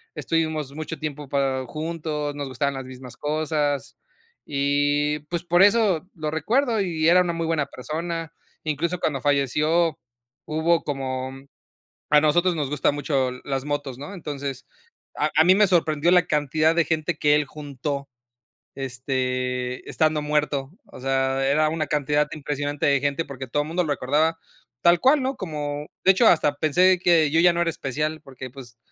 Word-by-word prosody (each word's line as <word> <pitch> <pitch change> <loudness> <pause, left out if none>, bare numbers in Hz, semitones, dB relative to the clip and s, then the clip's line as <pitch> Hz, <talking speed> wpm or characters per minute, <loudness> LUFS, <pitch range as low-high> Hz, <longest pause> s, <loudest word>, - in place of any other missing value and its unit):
estuvimos 155 -4 -1
mucho 155 +1 -6
tiempo 150 -2 -5
para 135 -2 0
juntos, 155 +1 -4
nos 145 -1 -4
gustaban 140 +2 -1
las 135 -1 -6
mismas 130 -1 -10
cosas, 150 -1 -1 0.5
y 145 +1 +1
pues 170 0 -2
por 175 +1 +3
eso, 200 -5 +3
lo 155 -2 -3
recuerdo 225 - +1
y 160 -4 0
era 180 +1 +6
una 175 -1 -1
muy 165 0 -2
buena 160 -3 0
persona. 165 +4 -5 0.3
Incluso 160 +3 -1
cuando 140 -4 -1
falleció, 150 +4 +1 0.5
hubo 160 +2 +1
como 130 -2 -3 0.8
a 150 - +6
nosotros 175 +4 +3
nos 145 -4 -2
gustan 145 0 +1
mucho 135 -3 0
las 135 -1 -2
motos, 145 -3 -3
¿no?, 145 +8 -7
entonces, 140 -7 -5 0.5
a 155 +1 +3
mí 185 +2 +6
me 210 - +5
sorprendió 165 -2 +2
la 180 -2 +5
cantidad 155 +2 +1
de 170 - +4
gente 160 +2 -1
que 150 0 +4
él 150 0 +1
juntó, 140 -1 -5 0.7
este 125 -1 -3
estando 155 -1 +1
muerto. 150 -2 -1 0.2
O - - -13
sea, 135 0 0
era 155 +2 +3
una 155 -1 -2
cantidad 150 0 +1
impresionante 145 -1 -2
de 140 -1 +3
gente 145 +3 -1
porque 135 -1 -7
todo 145 +4 0
el 150 - -8
mundo 180 +2 0
lo 150 - 0
recordaba, 150 +5 +1 0.4
tal 170 0 +5
cual, 280 +3 +5
¿no?, 265 +1 -1
como 150 -4 -4 0.2
de 190 - +7
hecho, 225 +5 +3
hasta 150 -3 +3
pensé 180 +5 +4
que 170 -4 +4
yo 165 - +4
ya 175 0 +6
no 170 - 0
era 170 - +1
especial 155 +1 -3
porque 130 -2 -9
pues, 120 -3 -12
150 Hz, 165 wpm, -24 LUFS, 140-165 Hz, 0.8 s, de